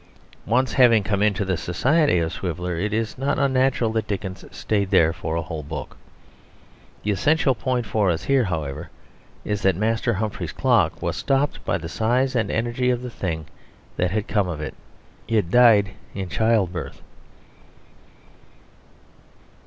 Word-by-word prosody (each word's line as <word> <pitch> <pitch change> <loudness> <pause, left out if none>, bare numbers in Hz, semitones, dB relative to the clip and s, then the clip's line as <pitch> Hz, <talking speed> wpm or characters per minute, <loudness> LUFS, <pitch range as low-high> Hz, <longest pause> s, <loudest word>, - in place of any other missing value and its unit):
Once 130 +3 +1
having 115 -5 +5
come 100 0 -1
into 105 -1 +1
the 95 -1 0
society 130 - +2
of 80 -1 -1
Swiveller 90 -1 -3
it 100 +6 -2
is 115 +2 -2
not 140 +1 0
unnatural 130 -4 +2
that 110 -1 -2
Dickens 95 -2 -4
stayed 100 -3 -1
there 80 -2 +4
for 80 -2 -4
a 85 - -1
whole 80 -1 -5
book. 75 +1 -7 1.1
The 105 - 0
essential 145 - +2
point 125 +1 -2
for 105 -3 +1
us 85 0 -1
here, 135 -3 +2
however, 80 -7 -4 0.6
is 105 -1 -2
that 95 -3 +3
Master 110 +3 0
Humphrey's 110 +1 -3
Clock - - +2
was - - -1
stopped 135 +1 0
by - - +1
the 80 -2 -7
size 125 +8 0
and 115 - +1
energy 120 +2 0
of 125 0 0
the 125 - -6
thing 80 -7 -4 0.5
that 90 - 0
had 105 +3 -2
come 105 -4 +1
of 85 -4 -4
it. 75 - -5 0.5
It 105 -6 0
died 110 -5 +6 0.2
in 95 -2 -4
childbirth. 105 -3 0
105 Hz, 155 wpm, -23 LUFS, 90-120 Hz, 1.1 s, died